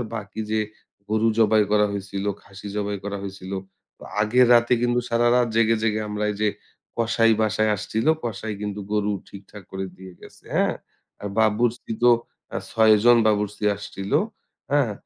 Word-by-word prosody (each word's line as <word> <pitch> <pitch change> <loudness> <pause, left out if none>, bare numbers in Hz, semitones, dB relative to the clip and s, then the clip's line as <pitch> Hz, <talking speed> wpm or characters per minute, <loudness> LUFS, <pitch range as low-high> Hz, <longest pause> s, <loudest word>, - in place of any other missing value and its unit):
আর 120 - -3
বাকি 110 +1 -6
যে, 110 0 +1 0.5
গরু 110 +1 +2
জবাই 110 -1 +5
করা 105 0 +4
হইছিল, 100 0 -4 0.2
খাসি 100 +1 -12
জবাই 105 0 -2
করা 100 0 -3
হইছিল। 95 -1 -7 0.7
আগের 120 +4 +4
রাতে 120 +1 +4
কিন্তু 120 0 +2
সারারাত 120 +1 +3
জেগে, 115 0 +3
জেগে 110 -1 +1
আমরা 105 0 -2
এই - - -8
যে, 105 - +3 0.5
কসাই 115 0 +3
বাসায় 110 0 +1
আসছিলো, 110 +10 0
কসাই 110 -1 -4
কিন্তু 105 0 -4
গরু 105 0 +1 0.2
ঠিকঠাক 100 +1 -12
করে 95 0 -3
দিয়ে 95 -1 -11
গেছে, - - -15
হ্যাঁ? - - +2 0.5
আর 100 - -4
বাবুর্চি 115 +2 +1
তো 120 - +7 0.4
অ্যা - - -3
৬ 110 -1 +5
জন 120 0 +7
বাবুর্চি 105 0 0
আসছিল। 100 -1 -7 0.6
হ্যাঁ? 140 -7 +2
110 Hz, 160 wpm, -23 LUFS, 100-115 Hz, 0.7 s, তো